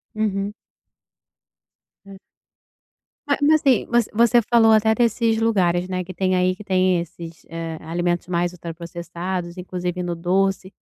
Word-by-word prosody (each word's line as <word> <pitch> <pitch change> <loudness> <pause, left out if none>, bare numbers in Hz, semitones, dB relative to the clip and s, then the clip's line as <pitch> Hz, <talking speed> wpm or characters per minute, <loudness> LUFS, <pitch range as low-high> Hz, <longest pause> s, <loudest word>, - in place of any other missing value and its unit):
Uhum. 205 -1 -1 1.5
É. 195 -1 -12 1.1
Ma 285 - +2
mas 305 +1 +4
assim, 270 -7 +3
voc 240 0 +2
você 235 +2 +4
falou 225 0 +4
até 220 0 +4
desses 230 0 +1
lugares, 185 -6 +1
né, 185 -1 -3
que 185 +1 -9
tem 185 +1 0
aí, 185 0 +2
que 210 - -11
tem 185 -2 +2
esses, 170 -1 -9
eh, 165 0 -5
alimentos 175 +2 -2
mais 175 -1 0
ultra 170 -2 -8
processados, 175 +1 -6
inclusive 180 0 -4
no 175 -1 -2
doce. 190 +2 0
185 Hz, 145 wpm, -22 LUFS, 175-215 Hz, 1.5 s, mas